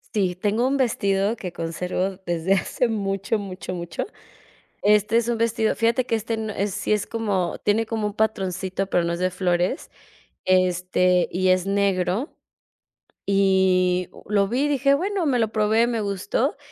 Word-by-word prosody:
Sí, 190 -4 +1
tengo 205 +6 0
un 275 +2 +1
vestido 200 -4 +1
que 185 -6 -6
conservo 180 +3 -3
desde 175 +2 +1
hace 195 +5 0
mucho, 200 0 -1
mucho, 185 -2 -6
mucho. 170 -1 -4 0.8
Este 210 +2 +3
es 235 -1 +1
un 235 -1 0
vestido, 225 -1 +1
fíjate 230 +2 +1
que 230 - 0
este 225 +1 -2
no 220 -1 -4
es, 200 -1 -2
sí - - 0
es 210 -1 0
como, 200 -6 -1
tiene 215 +2 +2
como 220 -1 -2
un 205 - -5
patroncito, 195 -3 -1
pero 175 - +2
no 170 - -1
es 170 - -3
de 185 0 +1
flores, 180 +4 -1 0.5
este, 180 -1 +2
y 185 +1 +1
es 185 -1 +3
negro, 195 - 0 0.9
y 190 -2 +2 0.2
lo 200 -1 +2
vi 245 +6 -1
y - - +2
dije: 280 -1 +3
"Bueno", 375 +2 -1
me 255 -3 +2
lo 225 -2 +1
probé, 220 +1 +3
me 235 -2 -1
gustó, 205 +8 -1
200 Hz, 170 wpm, -23 LUFS, 185-225 Hz, 0.9 s, Este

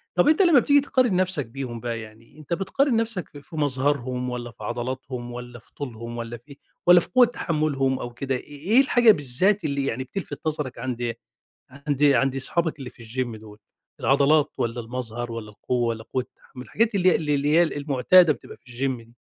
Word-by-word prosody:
طب - - +3
أنت 315 +5 +5
لمّا 335 -8 +6
بتيجي 285 +3 +4
تقارن 255 -7 +1
نَفْسك 180 -6 +1
بيهم 120 -1 -6
بقى 115 -1 -4
يعني 110 +5 -14
أنت 155 +2 -5
بتقارن 240 +8 +1
نَفْسك 225 -7 -2
في 145 - -12
في 160 - -13
مظهرهم 130 -3 0
والّا 120 -1 -5
في 115 - -13
عضلاتهم 120 0 -5
والّا 120 0 -8
في - - -28
طولهم 120 -3 -7
والّا 115 0 -5
في 140 +4 -16 0.3
والّا 175 0 +9
في - - -5
قوة 250 -1 +6
تحمُّلهم 150 - -1
أو 120 0 -6
كده، 135 +1 -2
إيه 145 +3 -9
إيه 250 - +7
الحاجة 245 -4 +5
بالذات 170 +6 +1
اللي 140 -2 -1
يعني 130 0 -2
بتلفِت 145 0 -6
نظرك 150 -5 -3
عند 120 -2 -3 0.6
عند 140 +1 -4
عند 135 -1 +3
اصحابك 160 +4 -1
اللي 130 -2 -7
في 120 - -16
الgym 120 -1 -4
دول، 105 -1 -13 0.4
العضلات 145 +2 +3
والّا 120 +1 -2
المظهر 120 0 -5
والّا 110 -2 -6
القوة 120 +3 -1
والّا 110 -1 -3
قوة 130 +2 -2
التحمُّل؟ 125 0 -14
الحاجات 225 0 0
اللي 185 -1 +4
هي - - +3
اللي 150 -2 -1
اللي 140 +1 0
هي 170 - +6
المُعتادة 150 +2 +4
بتبقى 120 - -12
في 125 - -17
الgym 130 +1 -1
دي. 120 - -23
135 Hz, 200 wpm, -24 LUFS, 120-160 Hz, 0.6 s, والّا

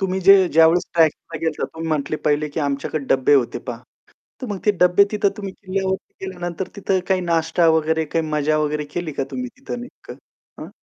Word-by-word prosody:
तुम्ही 190 -1 -1
जे 195 +2 +8
ज्यावेळेस 165 +3 +4
ट्रॅकला 165 0 +1
गेलं 165 +1 0
होता, - - -1
तुम्ही 160 0 -5
म्हटले 155 -1 -1
पहिले, 150 0 +1
की 145 +2 -4
आमच्याकडे 140 +1 -2
डब्बे 135 +2 +3
होते 130 -4 +1
पहा. 120 -3 -7 0.6
तर 255 - -4
मग 205 -3 -4
ते 210 - +5
डब्बे 180 +2 +6
तिथं 205 -1 +2
तुम्ही 200 -2 -6
किल्ल्यावरती 190 0 -4
गेल्यानंतर, 175 -1 -5
तिथं 195 -2 0
काही 190 -1 +1
नाश्ता 165 0 +1
वगैरे 160 0 0
काही 160 +1 -1
मजा 150 0 +1
वगैरे 150 0 -1
केली 175 -3 -3
का 135 - -2
तुम्ही 255 0 -4
तिथं 270 -2 -6
नेमकं 245 - -11 0.5
हां? - - -8
165 Hz, 195 wpm, -21 LUFS, 150-190 Hz, 0.6 s, जे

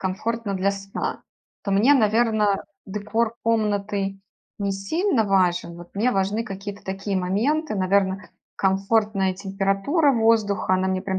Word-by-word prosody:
1комфортно 205 +3 -2
для 195 +1 +1
сна, 195 0 -4 0.4
то 200 - -1
мне, 230 +9 +5
наверно, 215 -3 +2 0.2
декор 220 +3 -1
комнаты 205 -3 0 0.4
не 200 0 0
сильно 225 - 0
важен, 180 -3 +1
вот 175 +3 -13
мне 245 +4 +2
важны 200 +4 0
какие-то 200 -1 -7
такие 195 +1 -3
моменты, 215 - 0
наверно, 190 0 +1 0.3
комфортная 195 0 +1
температура 195 - +1
воздуха, 220 -5 +2
она 185 0 +1
мне 185 0 -1
прям 190 -1 -2
200 Hz, 130 wpm, -23 LUFS, 195-225 Hz, 0.4 s, мне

